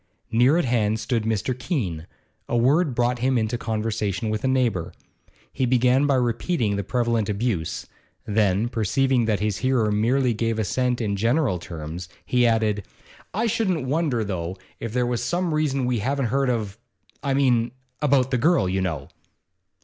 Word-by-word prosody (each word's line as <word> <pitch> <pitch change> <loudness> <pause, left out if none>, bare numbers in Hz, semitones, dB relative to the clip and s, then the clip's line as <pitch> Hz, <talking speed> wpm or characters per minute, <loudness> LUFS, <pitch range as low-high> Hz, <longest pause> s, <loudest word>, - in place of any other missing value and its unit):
Near 125 +7 +4
at 175 - +1
hand 110 -3 +1
stood 115 -3 -1
Mr. 110 +3 0
Keene; 105 - -3 0.4
a 120 - +1
word 140 +4 +3
brought 120 0 +1
him 130 +1 +2
into 110 +1 0
conversation 110 -2 -2
with 110 - -2
a - - +2
neighbour. 115 -10 0 0.6
He 130 -2 0
began 125 +3 +3
by 140 - +3
repeating 120 - 0
the 100 - -2
prevalent 115 -1 0
abuse, 100 -6 -2 0.4
then, 105 0 +2
perceiving 120 +2 +1
that 105 -3 0
his 105 -2 0
hearer 130 -5 +1
merely 120 +4 +2
gave 115 0 -1
assent 125 +4 0
in 100 -3 -1
general 115 - +1
terms, 85 +1 -7 0.2
he 125 -1 +3
added: 110 -3 +1 0.5
'I 225 +3 +1
shouldn't 190 - 0
wonder, 140 -4 0
though, 95 -2 -4 0.2
if 115 - -4
there 125 +1 +1
was 120 -1 -1
some 175 -2 0
reason 140 -4 0
we 125 -2 0
haven't 135 +5 0
heard 135 -1 +2
of 110 -3 -2 0.4
I 140 -2 0
mean, 125 -4 +3 0.3
about 135 -3 +3
the 125 - +1
girl, 165 - +3
you 95 +1 0
know. 90 -5 -3
120 Hz, 165 wpm, -24 LUFS, 105-130 Hz, 0.6 s, Near